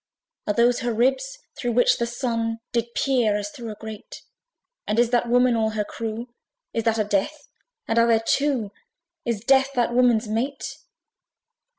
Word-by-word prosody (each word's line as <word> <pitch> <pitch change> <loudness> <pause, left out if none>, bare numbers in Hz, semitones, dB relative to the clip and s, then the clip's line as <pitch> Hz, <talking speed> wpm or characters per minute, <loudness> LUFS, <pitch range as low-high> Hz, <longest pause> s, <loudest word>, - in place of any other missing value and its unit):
Are 210 - +1
those 240 +1 +3
her 240 0 -1
ribs 265 - +1 0.2
through 245 -3 -2
which 245 +2 +4
the 235 - 0
Sun 230 -2 -2
Did 235 0 -2
peer, 240 -6 +2
as 205 0 -4
through 230 0 -8
a 215 - -6
grate? 220 0 -9 0.6
And 210 - 0
is 240 0 +3
that 240 -1 +1
Woman 245 0 +4
all 220 -1 +1
her 210 - +1
crew? 230 +3 -6 0.4
Is 230 0 -2
that 225 -1 +2
a 215 - +2
DEATH? 210 +9 -2 0.4
and 225 +1 +2
are 230 - +5
there 225 -1 +3
two? 265 -8 +1 0.5
Is 230 -4 -1
DEATH 270 +2 +3
that 240 -2 +1
woman's 240 -2 +3
mate? 235 +6 -3
235 Hz, 175 wpm, -24 LUFS, 220-250 Hz, 0.6 s, are